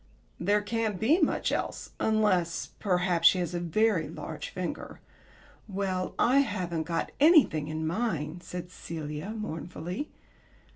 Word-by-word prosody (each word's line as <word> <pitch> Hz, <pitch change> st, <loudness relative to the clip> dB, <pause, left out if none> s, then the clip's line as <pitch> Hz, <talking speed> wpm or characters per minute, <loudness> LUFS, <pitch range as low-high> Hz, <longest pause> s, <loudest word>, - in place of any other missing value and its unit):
"There 205 Hz, +4 st, +2 dB
can't 220 Hz, -3 st, -1 dB
be 285 Hz, +11 st, +4 dB
much -, -, +2 dB
else -, -, -3 dB
unless 195 Hz, -6 st, +1 dB
perhaps 180 Hz, -3 st, +3 dB
she -, -, +6 dB
has 180 Hz, -1 st, -2 dB
a 175 Hz, -, -1 dB
very 175 Hz, 0 st, +1 dB
large -, -, -6 dB
finger." -, -, -5 dB, 0.7 s
"Well, 190 Hz, -2 st, -2 dB
I 260 Hz, +3 st, +5 dB
haven't 180 Hz, -, -1 dB
got 170 Hz, -1 st, -1 dB
anything 285 Hz, -, +5 dB
in 155 Hz, +1 st, -3 dB
mine," 170 Hz, -3 st, -2 dB
said 180 Hz, 0 st, -7 dB
Celia, 155 Hz, 0 st, -6 dB
mournfully. 180 Hz, -, -5 dB
180 Hz, 130 wpm, -29 LUFS, 165-215 Hz, 0.7 s, she